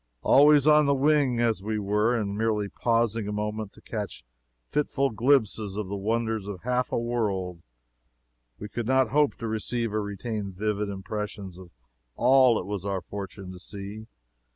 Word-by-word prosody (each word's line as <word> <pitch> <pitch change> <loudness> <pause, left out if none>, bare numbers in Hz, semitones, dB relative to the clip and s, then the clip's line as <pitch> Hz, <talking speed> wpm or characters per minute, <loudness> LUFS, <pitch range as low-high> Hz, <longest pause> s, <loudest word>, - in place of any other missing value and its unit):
Always 145 0 +6
on 150 -1 +6
the 140 - +3
wing, 140 -3 +2
as 115 -4 +1
we 110 +2 -2
were, 105 +4 +1
and 100 -2 -2
merely 105 -1 0
pausing 115 -1 0
a - - -2
moment 105 0 -3
to - - -17
catch 105 -3 -5 0.4
fitful 140 -2 0
glimpses 110 -4 +1
of 105 -3 -3
the 100 - -3
wonders 110 0 -1
of 95 -3 -6
half 125 +1 0
a - - 0
world, 100 -7 -2 1.0
we 105 - -7
could 115 +2 -4
not 130 -2 +3
hope 145 +2 +2
to 115 - -5
receive 110 +1 -2
or 110 - 0
retain 100 0 -4
vivid 105 +1 -1
impressions 100 -1 -5
of 90 -2 -12 0.5
all 130 -2 +5
it - - -6
was 100 -2 -4
our 100 -2 -2
fortune 100 -1 -7
to 90 - -10
see. 100 +3 -8
110 Hz, 170 wpm, -27 LUFS, 100-120 Hz, 1.0 s, Always